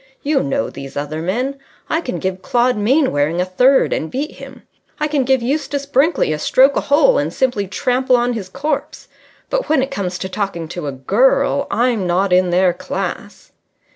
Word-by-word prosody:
You 290 Hz, -1 st, +1 dB
know 135 Hz, -5 st, -2 dB
these 135 Hz, 0 st, -9 dB
other 150 Hz, +2 st, -4 dB
men. 250 Hz, +11 st, -2 dB, 0.3 s
I 320 Hz, -, 0 dB
can 255 Hz, -6 st, -4 dB
give 185 Hz, 0 st, -3 dB
Claude 245 Hz, +1 st, +1 dB
Mainwaring 205 Hz, -, +1 dB
a 180 Hz, -, +1 dB
third 250 Hz, +9 st, +3 dB
and 160 Hz, -, -3 dB
beat 285 Hz, +4 st, -3 dB
him. -, -, -11 dB, 0.4 s
I 300 Hz, -, +1 dB
can 290 Hz, -3 st, 0 dB
give 265 Hz, -2 st, +2 dB
Eustace 280 Hz, +1 st, -2 dB
Brinkley 280 Hz, -, +2 dB
a 150 Hz, -, -4 dB
stroke 270 Hz, -, +4 dB
a -, -, +1 dB
hole 405 Hz, +14 st, +3 dB
and -, -, -1 dB
simply 245 Hz, -7 st, -1 dB
trample 255 Hz, +5 st, +1 dB
on 245 Hz, 0 st, +1 dB
his 200 Hz, -5 st, -6 dB
corpse. 280 Hz, +6 st, -4 dB, 0.4 s
But -, -, -1 dB
when 305 Hz, -4 st, +3 dB
it 270 Hz, -, -4 dB
comes 185 Hz, -2 st, -3 dB
to 190 Hz, -, -4 dB
talking 190 Hz, -4 st, -4 dB
to 175 Hz, -3 st, -5 dB
a -, -, -2 dB
girl, 265 Hz, -, +1 dB
I'm 235 Hz, -5 st, 0 dB
not 180 Hz, +2 st, +1 dB
in 180 Hz, 0 st, +3 dB
their 180 Hz, 0 st, +3 dB
class." -, -, -6 dB
245 Hz, 190 wpm, -18 LUFS, 180-275 Hz, 0.4 s, stroke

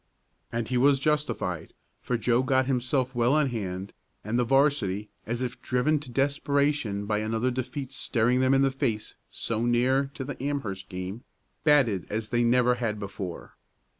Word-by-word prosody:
And 115 Hz, -1 st, -2 dB
he 125 Hz, -1 st, +1 dB
was 140 Hz, +2 st, +5 dB
justified, 140 Hz, -, -1 dB, 0.3 s
for 125 Hz, -, -1 dB
Joe 120 Hz, +2 st, +2 dB
got 130 Hz, 0 st, +2 dB
himself 130 Hz, 0 st, 0 dB
well 120 Hz, +4 st, +3 dB
in 150 Hz, -3 st, +2 dB
hand, 95 Hz, -4 st, -4 dB, 0.3 s
and 110 Hz, +4 st, -1 dB
the -, -, +3 dB
'varsity, 120 Hz, -6 st, +2 dB, 0.2 s
as 120 Hz, +2 st, -2 dB
if 125 Hz, -, -5 dB
driven 130 Hz, +5 st, +1 dB
to 140 Hz, -, -11 dB
desperation 140 Hz, -4 st, 0 dB
by 105 Hz, 0 st, 0 dB
another 110 Hz, +3 st, 0 dB
defeat 130 Hz, +2 st, -4 dB
staring 125 Hz, -1 st, +1 dB
them 130 Hz, +1 st, +4 dB
in 135 Hz, -, +4 dB
the 135 Hz, -, +3 dB
face 125 Hz, -6 st, -2 dB, 0.2 s
so 115 Hz, 0 st, -2 dB
near 130 Hz, +3 st, +2 dB
to 135 Hz, -, -4 dB
the 135 Hz, -1 st, -6 dB
Amherst 120 Hz, -10 st, -3 dB
game, 95 Hz, +6 st, -6 dB, 0.4 s
batted 135 Hz, -, +3 dB
as 110 Hz, +1 st, -3 dB
they 120 Hz, 0 st, +2 dB
never 125 Hz, +1 st, +4 dB
had 115 Hz, -3 st, -2 dB
before. 95 Hz, -3 st, -6 dB
125 Hz, 165 wpm, -27 LUFS, 110-135 Hz, 0.4 s, was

